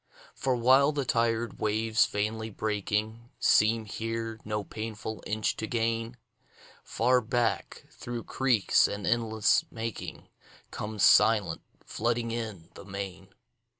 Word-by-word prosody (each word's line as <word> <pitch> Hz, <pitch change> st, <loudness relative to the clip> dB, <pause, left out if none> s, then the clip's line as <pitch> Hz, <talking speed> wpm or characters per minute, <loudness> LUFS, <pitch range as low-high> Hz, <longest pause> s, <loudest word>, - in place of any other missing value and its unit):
For 130 Hz, -2 st, 0 dB
while 130 Hz, +4 st, +5 dB
the 145 Hz, -2 st, -2 dB
tired 115 Hz, -1 st, 0 dB
waves, 110 Hz, +1 st, +2 dB
vainly 110 Hz, +2 st, -2 dB
breaking, 110 Hz, +2 st, -2 dB
Seem 110 Hz, +1 st, +3 dB
here 115 Hz, +1 st, -4 dB
no 105 Hz, -1 st, -3 dB
painful 110 Hz, 0 st, -6 dB
inch 110 Hz, 0 st, 0 dB
to 110 Hz, -, -3 dB
gain, 115 Hz, +1 st, -1 dB, 0.7 s
Far 125 Hz, +2 st, +2 dB
back, 120 Hz, 0 st, -1 dB
through 120 Hz, -1 st, -6 dB
creeks 125 Hz, -6 st, +3 dB
and 100 Hz, 0 st, -5 dB
inlets 110 Hz, -2 st, +2 dB
making, 115 Hz, -2 st, -6 dB, 0.4 s
Comes 105 Hz, -1 st, -3 dB
silent, 105 Hz, -7 st, +5 dB, 0.2 s
flooding 115 Hz, 0 st, -1 dB
in, 110 Hz, -8 st, -5 dB
the -, -, -11 dB
main. 95 Hz, -1 st, -7 dB
110 Hz, 115 wpm, -29 LUFS, 105-115 Hz, 0.7 s, while